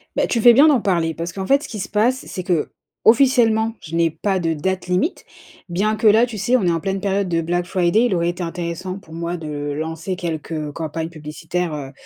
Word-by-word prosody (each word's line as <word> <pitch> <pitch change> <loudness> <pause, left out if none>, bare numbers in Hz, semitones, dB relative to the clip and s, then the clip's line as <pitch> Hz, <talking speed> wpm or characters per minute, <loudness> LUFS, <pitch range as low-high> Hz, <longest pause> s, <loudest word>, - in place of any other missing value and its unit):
Beh, - - +1
tu 230 - 0
fais 240 0 +8
bien 285 +6 +7
d'en 270 -7 +4
parler 170 -5 0
parce 170 +2 -5
qu'en 190 -1 -4
fait, 280 +5 +3
ce - - -6
qui 215 - -7
se 185 - -4
passe, 240 +5 +1
c'est 185 - -5
qu'officiellement, 225 - +2
je 165 0 -7
n'ai 165 -1 +3
pas 190 +4 -1
de 165 -2 0
date 185 +4 -2
limite. 185 - 0 0.5
Bien 210 +5 0
que, 220 - +2
là, 220 +3 +6
tu 235 -3 -8
sais, 240 +6 +2
on 195 - -1
est 175 - +3
en 165 - 0
pleine 195 +3 -2
période 195 -1 -1
de 165 -1 +1
Black 175 +2 -1
Friday, 185 +6 +2
il 195 - +1
aurait 170 0 +1
été 175 +1 -5
intéressant, 175 +2 -4
pour 160 -5 -14
moi, 170 +1 -3
de 145 -2 -5
lancer 160 +4 -4
quelques, 165 -3 -5
heu, 155 -2 -3
campagnes 160 +1 -4
publicitaires, 160 +2 -4
heu. 135 -2 -6
180 Hz, 235 wpm, -20 LUFS, 165-210 Hz, 0.5 s, fais